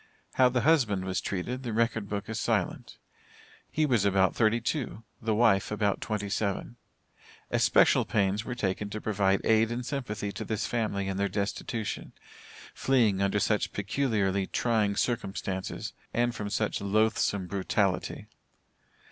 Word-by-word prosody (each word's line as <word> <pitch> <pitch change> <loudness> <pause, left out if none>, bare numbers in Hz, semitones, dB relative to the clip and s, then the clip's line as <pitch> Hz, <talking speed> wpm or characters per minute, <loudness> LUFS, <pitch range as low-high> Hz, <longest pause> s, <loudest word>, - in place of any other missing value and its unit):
How 130 -1 +5
the 125 -1 0
husband 120 -10 +3
was 95 0 -1
treated, 115 +7 -3
the 120 -4 -4
record 110 -2 0
book 100 -1 -3
is 110 0 -3
silent. - - -1 0.7
He 155 - +1
was 120 -8 +2
about 95 -2 +3
thirty 115 0 +3
two 120 -2 -3 0.2
the 110 -1 0
wife 105 -4 +3
about 105 -2 0
twenty 105 -2 -2
seven. 100 +3 -2 0.7
Especial - - +4
pains 100 +1 0
were 125 - -5
taken 100 -2 -2
to 110 - -4
provide 100 -2 +1
aid 110 +1 +4
and 120 +1 -3
sympathy 110 -7 -3
to - - -5
this 110 0 -2
family 105 -4 -1
in 95 -1 -2
their 100 0 0
destitution, 105 +3 -3 0.6
fleeing 115 -8 +2
under 100 +1 +2
such 105 +1 0
peculiarly 100 -3 0
trying 110 -4 +1
circumstances 95 -5 -2 0.2
and 120 0 +2
from 105 -3 -4
such 105 0 -1
loathsome 100 -1 +1
brutality. 95 0 -1
105 Hz, 145 wpm, -29 LUFS, 100-115 Hz, 0.7 s, How